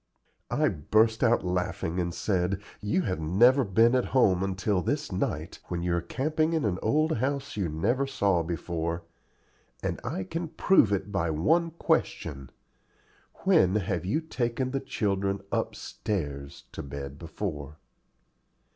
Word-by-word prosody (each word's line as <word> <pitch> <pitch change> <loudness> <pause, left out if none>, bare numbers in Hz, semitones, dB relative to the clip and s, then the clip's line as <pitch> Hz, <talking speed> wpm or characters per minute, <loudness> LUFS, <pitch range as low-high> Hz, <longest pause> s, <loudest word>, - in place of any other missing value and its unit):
I 150 +5 +2
burst 110 - +2
out 120 -4 +3
laughing 90 -1 -1
and 85 -1 -1
said, 90 +1 0 0.2
"You 105 - +1
have 90 - -2
never 120 - +5
been 115 +3 +4
at 130 -1 +2
home 95 -7 +4
until 95 0 0
this - - -2
night, - - -2
when 85 -1 -3
you 85 -1 +1
are 85 - 0
camping 155 - 0
in 160 -6 +1
an 95 -3 0
old 155 +5 +2
house 140 +3 -2
you 95 -5 -1
never 120 - 0
saw 100 -9 +2
before, 85 0 -3 0.8
and - - -2
I 95 - -3
can 165 - -4
prove 160 - +4
it 100 0 -1
by 85 -4 0
one 160 - +2
question 70 - -1 0.9
When 95 +1 +4
have 95 -4 -1
you 135 - 0
taken 130 -4 -2
the 135 - 0
children 100 -4 -1
UPSTAIRS 70 -9 -3
to - - -6
bed 70 0 -7
before?" 75 -4 -5
100 Hz, 145 wpm, -28 LUFS, 85-125 Hz, 0.9 s, never